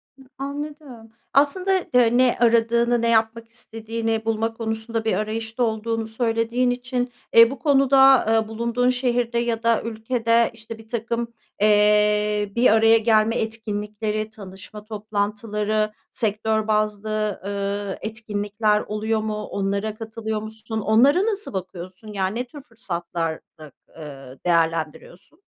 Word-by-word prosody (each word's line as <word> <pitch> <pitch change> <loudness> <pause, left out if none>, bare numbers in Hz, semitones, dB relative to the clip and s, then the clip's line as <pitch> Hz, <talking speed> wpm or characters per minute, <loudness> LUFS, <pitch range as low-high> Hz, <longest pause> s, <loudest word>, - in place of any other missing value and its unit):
Hı, 270 - -19 0.2
anladım. 280 -4 -7 0.2
Aslında 295 +8 +2 0.2
de 245 -1 +4
ne 255 -1 +3
aradığını, 235 0 +3
ne 235 - +1
yapmak 225 0 +1
istediğini 225 -1 -4
bulma 225 0 0
konusunda 225 0 -3
bir 220 - +1
arayışta 220 +4 -2
olduğunu 225 0 -1
söylediğin 230 +2 0
için, 245 0 -3 0.2
eee, 230 0 +8
bu 275 - -7
konuda, 270 -2 +5
eee, 225 -1 +2
bulunduğun 235 +2 0
şehirde 245 -2 0
ya 230 -1 -2
da 230 -1 +3
ülkede, 230 +1 +1
işte, 225 0 -10
birtakım, 235 +1 -4 0.3
eee, 210 0 +3
bir 240 +2 +4
araya 225 +1 +5
gelme 225 0 +3
etkinlikleri, 215 -1 -3
tanışma 205 0 -11
toplantıları, 210 0 -2 0.2
sektör 220 0 0
bazlı, 215 -1 -1
eee, 200 0 -3
etkinlikler 210 -1 -1
oluyor 215 +1 -2
mu? 215 0 -3
Onlara 200 +2 -2
katılıyor 220 -1 -4
musun? 220 0 -6
Onlara 270 - +4
nasıl 420 - -3
bakıyorsun? 185 +1 -7
Yani 195 +4 -1
ne 250 - -2
tür 290 +3 -11
fırsatlarda, 170 - -5 0.3
eee, 135 -4 -10
değerlendiriyorsun? 165 - -1
220 Hz, 120 wpm, -23 LUFS, 210-235 Hz, 0.3 s, eee